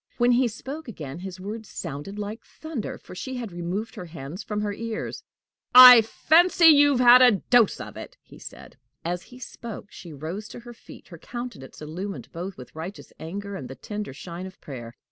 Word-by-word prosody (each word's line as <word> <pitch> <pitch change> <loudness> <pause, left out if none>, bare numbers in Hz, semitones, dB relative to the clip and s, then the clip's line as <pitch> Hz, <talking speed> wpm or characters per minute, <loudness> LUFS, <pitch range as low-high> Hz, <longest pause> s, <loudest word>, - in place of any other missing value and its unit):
When 240 0 +3
he 245 +1 +3
spoke 270 +7 -7
again, 155 - -7
his 185 0 -8
words 215 +3 -7
sounded 170 +5 -7
like 210 +2 -6
thunder, 315 -9 -7
for - - -13
she 260 +8 -6
had 235 -5 -5
removed 175 +6 -4
her 180 - -8
hands 160 +3 -8
from 210 -1 -4
her 205 -1 -2
ears. 225 +1 -5 0.5
"I 250 -2 +12
fancy 335 +10 +3
you've 290 -4 +7
had 250 0 +8
a 250 -3 +7
dose 230 +3 +3
of - - -8
it!" - - -10
he - - -16
said. - - -12 0.3
As 175 +1 -2
he 250 - -15
spoke, 230 -4 -9
she 170 - -11
rose 160 +9 -6
to 235 - -10
her 240 0 -11
feet, - - -15
her - - -11
countenance 240 - -8
illumined 185 +6 -6
both 180 +3 -6
with 125 +2 -12
righteous 170 +5 -8
anger 200 +5 -6
and 135 -9 -7
the 135 - -8
tender 210 +2 -6
shine 170 +6 -8
of 185 - -14
prayer. 120 -4 -9
205 Hz, 195 wpm, -25 LUFS, 175-240 Hz, 0.5 s, I